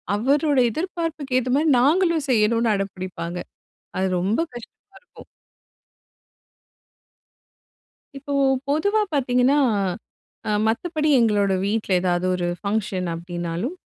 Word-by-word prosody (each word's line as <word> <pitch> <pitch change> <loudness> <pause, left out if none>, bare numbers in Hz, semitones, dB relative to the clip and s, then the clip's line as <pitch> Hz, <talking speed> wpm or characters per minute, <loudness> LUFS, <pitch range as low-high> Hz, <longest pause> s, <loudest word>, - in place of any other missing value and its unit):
அவருடைய 275 +3 +2
எதிர்பார்ப்புக்கு 320 -6 -3
ஏத்த 255 0 -3
மாதிரி 310 +1 +2
நாங்களும் 330 +1 +2
செய்யணும்னு 225 0 +2
அடம்பிடிப்பாங்க." 185 -3 -5 0.6
அது 190 +1 +1
ரொம்ப 200 - 0
கஷ்டமா 240 -1 -13
இருக்கும். 485 - -16 2.9
இப்போ 280 +1 -6 0.4
பொதுவா 405 +9 +1
பார்த்தீங்கன்னா, 255 0 +2 0.9
அ - - 0 0.2
மத்தபடி 310 +7 -1
எங்களோட 205 -4 +2
வீட்டில 210 -1 -1
ஏதாவது 180 0 0
ஒரு 180 -1 -2
ஃபங்ஷன் 200 -3 -2
அப்படினாலும். 175 - -4
235 Hz, 95 wpm, -22 LUFS, 190-295 Hz, 2.9 s, அவருடைய